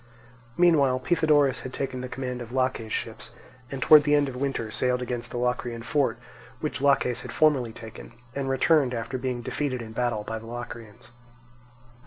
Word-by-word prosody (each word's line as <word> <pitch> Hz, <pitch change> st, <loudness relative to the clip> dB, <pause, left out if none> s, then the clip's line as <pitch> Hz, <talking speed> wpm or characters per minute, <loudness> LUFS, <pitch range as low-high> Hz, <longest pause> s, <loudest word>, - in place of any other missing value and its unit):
Meanwhile 150 Hz, -7 st, +4 dB
Pythodorus 145 Hz, -3 st, +3 dB
had 130 Hz, -, -7 dB
taken 130 Hz, -2 st, -3 dB
the 130 Hz, -, -5 dB
command 125 Hz, -1 st, -4 dB
of 120 Hz, -1 st, -8 dB
Laches' 130 Hz, -4 st, -1 dB
ships, -, -, -4 dB, 0.4 s
and 135 Hz, -1 st, -3 dB
towards 150 Hz, -1 st, +8 dB
the 150 Hz, 0 st, +3 dB
end 145 Hz, -1 st, +3 dB
of 130 Hz, -, -6 dB
winter 130 Hz, -4 st, -2 dB
sailed 125 Hz, +2 st, 0 dB
against 120 Hz, -1 st, -4 dB
the -, -, -5 dB
Locrian 120 Hz, -1 st, -2 dB
fort, 125 Hz, -1 st, +1 dB, 0.4 s
which 150 Hz, -3 st, -3 dB
Laches 135 Hz, -3 st, +2 dB
had -, -, -7 dB
formerly 140 Hz, -7 st, +3 dB
taken, 110 Hz, 0 st, -11 dB, 0.2 s
and 135 Hz, -1 st, -2 dB
returned 135 Hz, -1 st, +3 dB
after 120 Hz, +3 st, -4 dB
being 125 Hz, -2 st, -3 dB
defeated 135 Hz, 0 st, -2 dB
in 115 Hz, -2 st, -8 dB
battle 120 Hz, -2 st, -1 dB
by 110 Hz, +1 st, -4 dB
the 115 Hz, -, -12 dB
Locrians. 120 Hz, -2 st, -9 dB
125 Hz, 175 wpm, -26 LUFS, 120-140 Hz, 0.4 s, towards